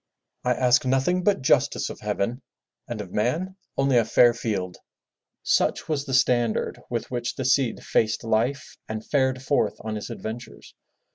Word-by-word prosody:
"I 125 Hz, 0 st, +2 dB
ask 125 Hz, 0 st, +3 dB
nothing 135 Hz, +8 st, +1 dB
but 195 Hz, -7 st, +2 dB
justice -, -, +2 dB
of -, -, -10 dB
heaven 120 Hz, +7 st, -2 dB, 0.5 s
and 120 Hz, -4 st, -4 dB
of 95 Hz, -3 st, -9 dB
man 160 Hz, -, -1 dB, 0.2 s
only 135 Hz, -2 st, +3 dB
a 115 Hz, -, +5 dB
fair 120 Hz, +2 st, +5 dB
field!*' 100 Hz, -6 st, -3 dB, 0.7 s
Such -, -, +1 dB
was 145 Hz, -3 st, -1 dB
the 135 Hz, -, -5 dB
standard 120 Hz, -3 st, +1 dB
with 120 Hz, 0 st, -3 dB
which 120 Hz, -1 st, -2 dB
the 130 Hz, -, -4 dB
Cid 130 Hz, -2 st, +2 dB
faced 110 Hz, +1 st, +1 dB
life 115 Hz, +6 st, -1 dB
and 110 Hz, 0 st, -5 dB
fared 130 Hz, -2 st, +1 dB
forth 140 Hz, -, +1 dB
on 110 Hz, 0 st, -4 dB
his 105 Hz, -, -5 dB
adventures. 115 Hz, +2 st, -8 dB
125 Hz, 160 wpm, -25 LUFS, 110-135 Hz, 0.7 s, a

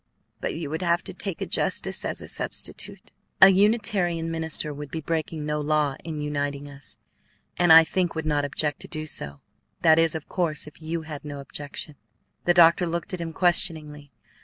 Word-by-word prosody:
But -, -, -3 dB
you 155 Hz, -3 st, -5 dB
would 160 Hz, -, -3 dB
have 170 Hz, -1 st, +2 dB
to -, -, -5 dB
take -, -, -3 dB
a -, -, 0 dB
justice -, -, 0 dB
as -, -, -3 dB
a -, -, -9 dB
substitute." -, -, -2 dB, 0.3 s
"A 190 Hz, -, +10 dB
Unitarian 190 Hz, -5 st, +2 dB
minister 160 Hz, -2 st, -2 dB
would 145 Hz, 0 st, -8 dB
be 160 Hz, -, -4 dB
breaking 160 Hz, 0 st, -3 dB
no 150 Hz, 0 st, -1 dB
law 150 Hz, -2 st, +1 dB
in 160 Hz, -1 st, -5 dB
uniting 145 Hz, -1 st, -3 dB
us, 140 Hz, 0 st, -9 dB, 0.6 s
and 175 Hz, -2 st, +3 dB
I 165 Hz, 0 st, +10 dB
think 175 Hz, +1 st, -1 dB
would 160 Hz, -1 st, -3 dB
not 150 Hz, -2 st, +1 dB
object 145 Hz, +1 st, -2 dB
to -, -, -9 dB
do 155 Hz, 0 st, -5 dB
so; 70 Hz, -, -4 dB, 0.4 s
that 160 Hz, -1 st, +6 dB
is, 165 Hz, -1 st, +3 dB
of 160 Hz, -, -6 dB
course, 165 Hz, -5 st, -1 dB
if 150 Hz, +1 st, -14 dB
you 160 Hz, +1 st, -4 dB
had 155 Hz, -2 st, -8 dB
no 145 Hz, -1 st, -7 dB
objection." 145 Hz, +1 st, -7 dB, 0.5 s
The 175 Hz, -, +3 dB
doctor 170 Hz, +1 st, +6 dB
looked 170 Hz, +4 st, -3 dB
at 180 Hz, -, -3 dB
him 165 Hz, -1 st, -4 dB
questioningly. 155 Hz, -4 st, 0 dB
160 Hz, 190 wpm, -25 LUFS, 150-170 Hz, 0.6 s, A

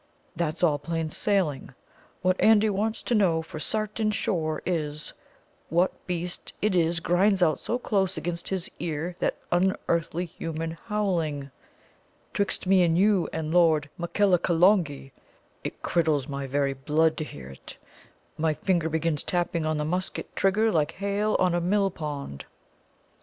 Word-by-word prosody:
that's 160 Hz, 0 st, -2 dB
all 150 Hz, -4 st, +3 dB
plain 165 Hz, +1 st, -3 dB
sailing. 155 Hz, -12 st, -1 dB, 0.5 s
What 185 Hz, 0 st, +3 dB
Andy 220 Hz, -1 st, +5 dB
wants 215 Hz, +3 st, -1 dB
to -, -, -1 dB
know 175 Hz, -7 st, +3 dB
for 155 Hz, -, -8 dB
sartin 215 Hz, +2 st, -1 dB
sure 165 Hz, -7 st, -1 dB
is: 155 Hz, -4 st, -2 dB, 0.6 s
what 175 Hz, +4 st, +2 dB
beast 175 Hz, 0 st, -4 dB
it 210 Hz, -2 st, +1 dB
is 170 Hz, -1 st, +2 dB
grinds 185 Hz, +3 st, +3 dB
out 160 Hz, -2 st, +2 dB
so 240 Hz, -, -2 dB
close 195 Hz, -6 st, 0 dB
against 170 Hz, 0 st, -4 dB
his 190 Hz, -3 st, -2 dB
ear 165 Hz, +2 st, -3 dB
that -, -, 0 dB
unearthly 175 Hz, -1 st, +1 dB
human 165 Hz, -1 st, -5 dB
howling? 165 Hz, -, -2 dB, 0.8 s
'Twixt 200 Hz, -2 st, -1 dB
me 190 Hz, 0 st, +5 dB
and 170 Hz, -1 st, +3 dB
you 195 Hz, -3 st, +3 dB
and 160 Hz, 0 st, -3 dB
Lord 160 Hz, -4 st, +4 dB
Makellacolongee, 175 Hz, -5 st, +2 dB, 0.5 s
it -, -, -6 dB
criddles 155 Hz, -5 st, +1 dB
my 140 Hz, -1 st, -4 dB
very 140 Hz, 0 st, 0 dB
blood 155 Hz, +4 st, +1 dB
to -, -, -2 dB
hear 65 Hz, -, -9 dB
it. 70 Hz, -, -11 dB, 0.6 s
My 155 Hz, -1 st, +1 dB
finger 170 Hz, -1 st, 0 dB
begins 160 Hz, -1 st, -1 dB
tapping 175 Hz, -2 st, -1 dB
on 155 Hz, 0 st, 0 dB
the 150 Hz, -, -1 dB
musket 180 Hz, +4 st, -3 dB
trigger 215 Hz, +3 st, +3 dB
like 155 Hz, -5 st, +1 dB
hail 200 Hz, +2 st, 0 dB
on 180 Hz, -2 st, +2 dB
a 175 Hz, -, +1 dB
millpond." 160 Hz, -, -2 dB
170 Hz, 145 wpm, -26 LUFS, 155-190 Hz, 0.8 s, Andy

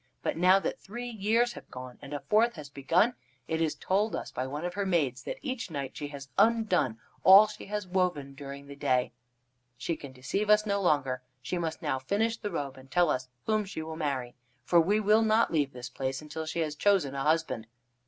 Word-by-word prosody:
But -, -, 0 dB
now 185 Hz, +3 st, +6 dB
that 195 Hz, -, -2 dB
three 240 Hz, +4 st, -6 dB
years 230 Hz, +3 st, +1 dB
have -, -, -12 dB
gone 125 Hz, -1 st, -9 dB
and 140 Hz, -, -10 dB
a 145 Hz, -, -3 dB
fourth 225 Hz, +3 st, +3 dB
has 150 Hz, -4 st, -9 dB
begun, 165 Hz, -, +2 dB, 0.3 s
it 160 Hz, 0 st, -1 dB
is 160 Hz, -2 st, +1 dB
told 205 Hz, +4 st, 0 dB
us -, -, -5 dB
by 130 Hz, -, -3 dB
one 145 Hz, +5 st, -4 dB
of 175 Hz, -, -3 dB
her 200 Hz, +1 st, -1 dB
maids 150 Hz, -10 st, +1 dB
that -, -, -5 dB
each 260 Hz, -7 st, -3 dB
night 140 Hz, -4 st, -5 dB
she 145 Hz, -, -4 dB
has 140 Hz, -1 st, -9 dB
undone 205 Hz, -, +3 dB, 0.3 s
all 195 Hz, +3 st, +10 dB
she 210 Hz, -1 st, -9 dB
has 210 Hz, 0 st, -3 dB
woven 180 Hz, -7 st, -1 dB
during 140 Hz, 0 st, -8 dB
the 140 Hz, 0 st, -10 dB
day. 130 Hz, -2 st, +1 dB, 0.7 s
She 145 Hz, +7 st, -2 dB
can 140 Hz, -3 st, -9 dB
deceive 130 Hz, +11 st, -2 dB
us 210 Hz, 0 st, +5 dB
no 200 Hz, -1 st, 0 dB
longer. 140 Hz, -7 st, +1 dB, 0.2 s
She 180 Hz, -, -2 dB
must 160 Hz, 0 st, -3 dB
now 140 Hz, -4 st, 0 dB
finish 210 Hz, +12 st, 0 dB
the 215 Hz, -2 st, -5 dB
robe, 140 Hz, -7 st, -4 dB
and 130 Hz, 0 st, -14 dB
tell 175 Hz, +2 st, +3 dB
us 130 Hz, -1 st, -2 dB, 0.2 s
whom 215 Hz, -1 st, +2 dB
she 190 Hz, -5 st, -6 dB
will 160 Hz, 0 st, -6 dB
marry. 135 Hz, -6 st, -2 dB, 0.3 s
For 170 Hz, +6 st, +5 dB
we 205 Hz, +6 st, +2 dB
will 215 Hz, +1 st, +4 dB
not 220 Hz, -3 st, +3 dB
leave 145 Hz, -3 st, +1 dB
this 125 Hz, -1 st, -7 dB
place 135 Hz, 0 st, -3 dB
until 155 Hz, +1 st, -6 dB
she 165 Hz, -, -2 dB
has 155 Hz, -2 st, -1 dB
chosen 180 Hz, -4 st, +2 dB
a 135 Hz, -, -3 dB
husband." 155 Hz, -7 st, 0 dB
160 Hz, 220 wpm, -29 LUFS, 140-205 Hz, 0.7 s, all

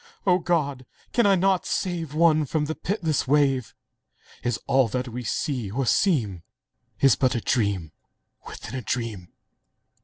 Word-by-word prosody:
O 180 Hz, -2 st, +4 dB
God! 145 Hz, -7 st, -1 dB, 0.3 s
can 235 Hz, -4 st, +4 dB
I 195 Hz, -, +5 dB
not 190 Hz, 0 st, +1 dB
save 165 Hz, -5 st, -2 dB
One 155 Hz, -1 st, +4 dB
from 150 Hz, +2 st, -1 dB
the 155 Hz, -, -2 dB
pitiless 165 Hz, -7 st, -1 dB
wave? 135 Hz, -3 st, +2 dB, 0.7 s
Is 120 Hz, -2 st, -1 dB
all 130 Hz, -1 st, +3 dB
that 125 Hz, +3 st, -3 dB
we 125 Hz, +2 st, -6 dB
see 125 Hz, -3 st, -2 dB
or 130 Hz, +6 st, -1 dB
seem 115 Hz, -, +1 dB, 0.8 s
But 130 Hz, -4 st, +2 dB
a -, -, +1 dB
dream 100 Hz, -9 st, 0 dB, 0.6 s
within -, -, -9 dB
a 130 Hz, -, -3 dB
dream?. 115 Hz, -7 st, -3 dB
135 Hz, 145 wpm, -25 LUFS, 120-165 Hz, 0.8 s, I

